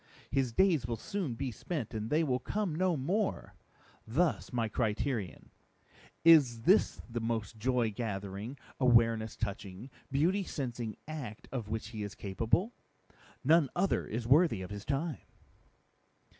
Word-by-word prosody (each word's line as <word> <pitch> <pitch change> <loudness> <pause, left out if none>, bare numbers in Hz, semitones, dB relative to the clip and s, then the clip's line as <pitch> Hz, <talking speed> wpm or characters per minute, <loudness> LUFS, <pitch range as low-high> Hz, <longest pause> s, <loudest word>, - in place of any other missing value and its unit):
His 135 -3 +1
Days 165 -3 +3
will 120 - -1
soon 170 - -3
be 130 +1 -3
spent 125 - -4
and 110 0 -3
they 155 +2 +3
will 130 -4 +1
come 205 - -2
no 180 0 +1
more; 190 +10 -1 0.5
thus 135 - +1
my 115 -2 0
Criterion: 110 - -2 0.7
Is 140 -9 +7
This - - +3
the 120 0 -4
most 115 -2 -2
Joy 120 -1 +1
gathering, 100 +2 -4 0.2
Awareness 115 -3 +4
touching, 100 +3 -5 0.2
Beauty 175 +9 +2
sensing 120 - -4
act 140 -9 -6
of 120 -5 -4
which 110 -1 -3
he 110 -2 -6
is 100 -1 -5
capable? 115 - 0 0.7
None 155 0 +5
other 195 +2 +1
is 115 +1 -3
worthy 135 - +4
of 90 - -8
his 100 0 -6
time!" 145 +1 -2
120 Hz, 140 wpm, -32 LUFS, 110-150 Hz, 0.7 s, Is